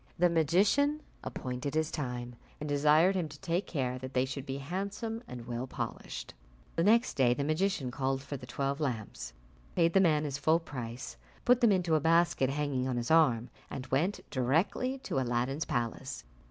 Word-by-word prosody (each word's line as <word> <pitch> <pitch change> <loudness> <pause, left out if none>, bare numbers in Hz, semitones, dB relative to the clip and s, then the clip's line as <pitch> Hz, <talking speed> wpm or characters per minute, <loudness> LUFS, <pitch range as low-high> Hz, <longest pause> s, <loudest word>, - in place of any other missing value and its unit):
The 175 0 +4
magician 200 - +3 0.2
appointed 130 +3 -4
his 155 0 +1
time, 125 -4 -4 0.2
and 150 - -4
desired 150 +5 +4
him 180 -5 -1
to 145 0 -11
take 175 +2 -1
care 130 -4 -2
that 130 +1 -8
they 125 +1 +3
should 135 +1 -6
be 135 0 -3
handsome 200 - -4
and 120 -2 -8
well 120 +1 -4
polished. - - -5 0.4
The 165 - +2
next 230 +5 +4
day 125 -3 +3
the 140 - -1
magician 155 -3 0
called 135 +1 -1
for 140 - -5
the 125 -2 -8
twelve 140 +2 -2
lamps, 125 -8 -3 0.4
paid 165 -1 +3
the 195 - +6
man 155 -5 +3
his 140 -2 -3
full 160 +3 +4
price, 125 -6 -7 0.3
put 250 0 +5
them 235 -3 +6
into 180 -4 +2
a 155 - +5
basket 165 -4 +3
hanging 140 -2 -1
on 125 -2 -1
his 120 +3 -2
arm, 125 -8 +4 0.2
and 130 - -5
went 165 +10 0
directly 165 - +1
to 135 - -1
Aladdin's 130 +4 0
palace. 120 -3 -3
145 Hz, 180 wpm, -31 LUFS, 130-170 Hz, 0.4 s, the